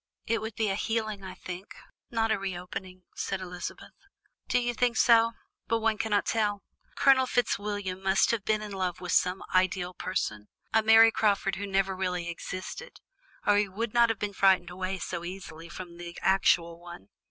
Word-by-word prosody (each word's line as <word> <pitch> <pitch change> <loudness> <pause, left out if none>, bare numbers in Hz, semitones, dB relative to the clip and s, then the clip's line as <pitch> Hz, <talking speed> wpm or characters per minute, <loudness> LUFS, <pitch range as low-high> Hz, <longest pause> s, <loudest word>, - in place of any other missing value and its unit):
"It 230 0 0
would 220 -1 -5
be 220 -2 0
a - - +1
healing, 215 -1 -2
I 185 -1 -7
think, 185 +2 -8 0.3
not 225 -1 0
a 220 - +1
reopening," 185 0 -6
said 195 - -2
Elizabeth. 180 -1 -7 0.5
"Do - - +2
you 240 0 0
think 240 0 +1
so? 230 -1 +5 0.3
But 230 - +2
one 220 -1 +1
cannot 220 -2 +1
tell. 210 -3 0 0.3
Colonel 265 -1 +5
Fitzwilliam 205 -5 -1
must 190 0 +3
have 230 -4 -1
been 215 0 0
in 210 - -7
love 185 -2 -2
with 180 -1 -5
some 180 +1 +2
ideal 185 -1 +1
person, 105 - -3 0.3
a 220 - +5
Mary 225 +1 +7
Crawford 200 -3 +1
who 200 +1 -4
never 195 0 +1
really 180 -2 -2
existed, 185 - -7 0.5
or 205 - +5
he 205 -1 +2
would 215 +3 -3
not 235 -1 +5
have 225 - 0
been 205 0 -3
frightened 190 -3 +3
away 185 +1 -3
so 175 -1 -4
easily 175 -2 -8
from 175 -1 -9
the 170 0 -8
actual 170 -3 +3
one. 175 - -11
195 Hz, 180 wpm, -28 LUFS, 180-220 Hz, 0.5 s, Mary